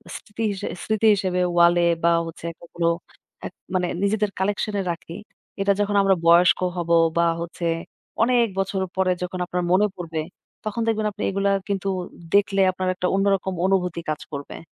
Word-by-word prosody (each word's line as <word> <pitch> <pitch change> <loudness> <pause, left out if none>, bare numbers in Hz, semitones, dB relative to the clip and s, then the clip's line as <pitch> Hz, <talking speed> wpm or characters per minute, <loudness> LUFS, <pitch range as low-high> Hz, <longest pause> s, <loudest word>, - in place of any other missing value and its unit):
স্মৃতি 225 +1 -6
হি - - -1 0.3
স্মৃতি 220 0 +1
হিসেবে 185 -2 -1 0.2
ওয়ালে 175 0 +5 0.2
বা 170 - +5 0.2
হচ্ছে 165 0 -9 0.2
এগুলো 170 0 -2 0.6
এক - - -6 0.2
মানে 180 -1 +1 0.2
নিজেদের 210 0 +1
কালেকশন 205 +2 -1
এ - - +1
রাখি। 170 0 -8 0.5
এটা 200 0 +3
যখন 205 0 0
আমরা 195 -1 +4
বয়স্ক 170 +2 +6 0.2
হব, 170 -1 -3 0.3
বা 170 - +4 0.2
হচ্ছে 170 0 -5 0.6
অনেক 240 -1 +3
বছর 195 0 -1
পরে 185 -1 +2
যখন 180 0 -4
আপনার 180 0 -2
মনে 195 +3 +5
পড়বে, 165 -3 -4 0.4
তখন 215 +2 -2
দেখবেন 220 -1 +1
আপনি - - -6
এগুলা 195 +1 +1 0.2
কিন্তু 195 -1 -2 0.5
দেখলে 200 -1 +3
আপনার 185 0 -3
একটা 180 0 -1
অন্যরকম 195 -1 +1
অনুভূতি 180 -3 0
কাজ 155 - -2
করবে। 140 -1 -6
190 Hz, 165 wpm, -23 LUFS, 175-200 Hz, 0.6 s, বয়স্ক